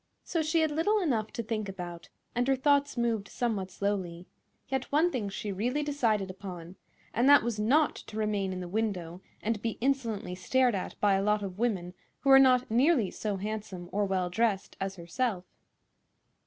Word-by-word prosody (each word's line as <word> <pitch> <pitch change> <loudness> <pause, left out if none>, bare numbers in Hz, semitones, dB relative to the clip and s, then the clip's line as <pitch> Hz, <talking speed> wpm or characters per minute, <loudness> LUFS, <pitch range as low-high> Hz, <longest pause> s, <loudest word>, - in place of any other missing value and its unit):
So 335 - -1
she 315 +1 +2
had 315 -1 +2
little 405 +8 +2
enough 235 - 0
to 235 -4 -3
think 215 -2 -3
about, 175 -2 -7 0.2
and 245 +1 0
her 270 - +4
thoughts 285 +1 +2
moved 230 -4 0
somewhat 210 -6 -2
slowly; 185 -3 -3 0.4
yet 265 -1 -3
one 320 +5 +3
thing 220 -8 -2
she 205 +1 -4
really 245 +10 -1
decided 225 -10 0
upon, 185 -2 -9 0.4
and 245 +4 +3
that 285 -4 +8
was 230 -2 -2
not 280 +8 +3
to 215 - -8
remain 210 -3 0
in 185 0 -4
the 180 - -5
window 185 -4 -2 0.2
and 220 -1 -1
be 225 -1 -2
insolently 235 -8 -1
stared 245 +7 +2
at 190 - -4
by 205 -1 +4
a 195 - +2
lot 210 +1 +1
of 190 0 -6
women 190 -7 -1 0.3
who 275 - +3
were 270 - +10
not 255 -2 +4
nearly 245 - +3
so 210 -2 -3
handsome 200 -3 -5
or 205 +1 +1
well 185 -2 -1
dressed 215 -1 0
as 195 0 -2
herself. 185 +2 -2
215 Hz, 185 wpm, -29 LUFS, 190-255 Hz, 0.4 s, were